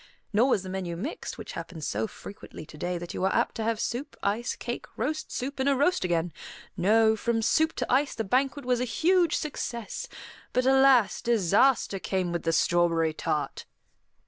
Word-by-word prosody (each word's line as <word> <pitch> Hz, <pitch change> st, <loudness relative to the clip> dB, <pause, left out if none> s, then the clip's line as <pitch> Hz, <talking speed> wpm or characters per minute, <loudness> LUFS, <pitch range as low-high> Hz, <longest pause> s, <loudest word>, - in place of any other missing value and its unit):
Nor 235 Hz, +6 st, +4 dB
was 200 Hz, -7 st, +2 dB
the 185 Hz, -, -7 dB
menu 185 Hz, -3 st, -4 dB
mixed, 255 Hz, -, -5 dB
which -, -, -7 dB
happens 165 Hz, -2 st, -7 dB
so 110 Hz, +2 st, -1 dB
frequently 200 Hz, -5 st, -10 dB
to 150 Hz, -, -13 dB
day 175 Hz, +4 st, -3 dB
that 175 Hz, 0 st, -7 dB
you -, -, -3 dB
are 190 Hz, -, +2 dB
apt -, -, +1 dB
to 225 Hz, -, -2 dB
have 225 Hz, 0 st, 0 dB
soup, 265 Hz, +6 st, -3 dB
ice, 215 Hz, +4 st, -1 dB
cake, 240 Hz, -, -5 dB
roast, 300 Hz, +7 st, -2 dB
soup, 270 Hz, +2 st, -4 dB
and 265 Hz, +1 st, +2 dB
a 280 Hz, -, +3 dB
roast 290 Hz, -, +2 dB
again. 170 Hz, -2 st, 0 dB, 0.4 s
No, 220 Hz, +4 st, +4 dB
from 225 Hz, +1 st, -1 dB
soup 315 Hz, +7 st, +2 dB
to -, -, -2 dB
ice 275 Hz, +3 st, +2 dB
the 225 Hz, -, -2 dB
banquet 265 Hz, +6 st, 0 dB
was 250 Hz, -1 st, +1 dB
a -, -, +1 dB
huge 340 Hz, -, +2 dB
success; 255 Hz, -, -4 dB, 0.5 s
but, 255 Hz, 0 st, +2 dB
alas, 265 Hz, -5 st, +5 dB
disaster 225 Hz, 0 st, +3 dB
came 185 Hz, -2 st, -1 dB
with 170 Hz, -1 st, -2 dB
the 165 Hz, -, 0 dB
strawberry 165 Hz, -1 st, +2 dB
tart. 150 Hz, -1 st, -3 dB
225 Hz, 190 wpm, -27 LUFS, 175-265 Hz, 0.5 s, alas